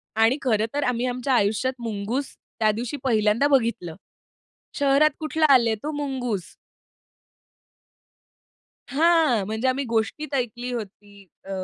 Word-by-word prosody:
आणि 225 +5 +3
खरं 220 -4 +1
तर 290 0 -1
आम्ही 250 0 0
आमच्या 250 +1 -1
आयुष्यात 220 +4 +1
मुंगूस, 230 +4 -4 0.2
त्या 215 -1 +3
दिवशी 240 +6 -4
पहिल्यांदा 220 +1 +2
बघितलं. 230 - 0 0.8
शहरात 285 +2 +4
कुठला 315 0 0
आले 235 -4 +4
तो 305 - -2
मुंगूज. 265 -8 -3 2.5
हां, 310 - +3
म्हणजे 220 +4 -1
आम्ही 270 +2 0
गोष्टीत 230 +7 -2
ऐकली 245 0 -3
होती. 205 -2 -8 0.2
अ, 195 - -10
245 Hz, 120 wpm, -24 LUFS, 220-275 Hz, 2.5 s, शहरात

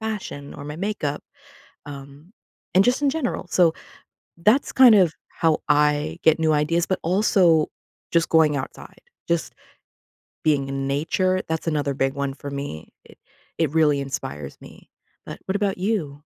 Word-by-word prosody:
fashion 210 -10 -5
or 145 - -9
my 150 0 -6
makeup, 170 -6 -3 0.6
um, 140 +5 -11 0.4
and 190 - +6
just 250 +3 +2
in 280 - +3
general, 265 - -3
so 175 -3 +4 0.7
that's 220 +11 +2
kind 255 -4 +7
of 185 -6 +4 0.2
how 160 -2 +1
I 150 0 +2
get 160 0 +4
new 160 -1 +2
ideas, 165 +3 +1
but 190 - -1
also 175 -3 +3 0.4
just 170 -1 +2
going 155 -3 +4
outside. 130 - -8 0.3
Just 170 -1 -1 0.9
being 140 -3 +2
in 135 0 -3
nature, 185 +6 0
that's 160 +1 -3
another 145 -3 0
big 135 0 0
one 140 -1 -3
for 140 +1 -8
me. 140 - -6 0.2
It - - -18 0.4
it 160 -3 +1
really 150 -3 +3
inspires 75 - -6
me, - - -15 0.4
but - - -8
what 190 - -2
about 200 -2 -1
you? 170 -8 -2
160 Hz, 155 wpm, -23 LUFS, 145-185 Hz, 0.9 s, kind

